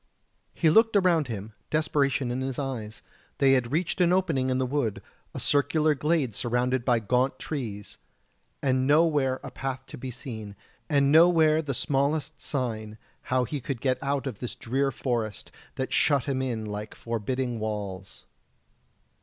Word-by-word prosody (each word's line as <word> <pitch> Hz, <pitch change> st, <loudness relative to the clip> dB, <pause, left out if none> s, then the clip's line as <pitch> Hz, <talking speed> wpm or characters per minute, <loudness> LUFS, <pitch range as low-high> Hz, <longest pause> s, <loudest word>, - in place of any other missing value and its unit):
He 160 Hz, -3 st, +3 dB
looked 225 Hz, +5 st, +5 dB
around 175 Hz, -7 st, +3 dB
him, 110 Hz, -2 st, -6 dB, 0.2 s
desperation 140 Hz, -4 st, +1 dB
in 125 Hz, +2 st, -2 dB
his 130 Hz, -1 st, -3 dB
eyes; 120 Hz, -6 st, -5 dB, 0.3 s
they 135 Hz, -1 st, +4 dB
had 125 Hz, -3 st, +2 dB
reached 175 Hz, +4 st, 0 dB
an 175 Hz, -1 st, +4 dB
opening 165 Hz, -9 st, +1 dB
in 130 Hz, -, +1 dB
the 130 Hz, -, +1 dB
wood 125 Hz, -5 st, -1 dB, 0.4 s
a -, -, -3 dB
circular 150 Hz, +2 st, +2 dB
glade 150 Hz, -3 st, 0 dB
surrounded 125 Hz, +3 st, 0 dB
by 125 Hz, -1 st, +3 dB
gaunt 125 Hz, +4 st, +1 dB
trees, 110 Hz, -9 st, -5 dB, 0.7 s
and 130 Hz, -1 st, +2 dB
nowhere 145 Hz, -4 st, +3 dB
a -, -, -7 dB
path 135 Hz, -1 st, -4 dB
to -, -, -10 dB
be 130 Hz, -, -5 dB
seen, 110 Hz, -5 st, -7 dB, 0.3 s
and 140 Hz, -2 st, +3 dB
nowhere 160 Hz, -1 st, +6 dB
the 140 Hz, -4 st, -3 dB
smallest 145 Hz, +3 st, 0 dB
sign 110 Hz, -6 st, -3 dB, 0.3 s
how 130 Hz, 0 st, +3 dB
he 140 Hz, +3 st, -4 dB
could 130 Hz, 0 st, -4 dB
get 130 Hz, 0 st, 0 dB
out 140 Hz, 0 st, -1 dB
of 125 Hz, -7 st, -5 dB
this 125 Hz, -, -5 dB
drear 135 Hz, +4 st, 0 dB
forest, 115 Hz, -4 st, -3 dB, 0.2 s
that 130 Hz, -, -3 dB
shut 140 Hz, -5 st, +3 dB
him 135 Hz, -2 st, -1 dB
in 120 Hz, -4 st, -2 dB
like 105 Hz, 0 st, -6 dB
forbidding 120 Hz, +2 st, -2 dB
walls. 100 Hz, -3 st, -5 dB
130 Hz, 160 wpm, -27 LUFS, 120-145 Hz, 0.7 s, nowhere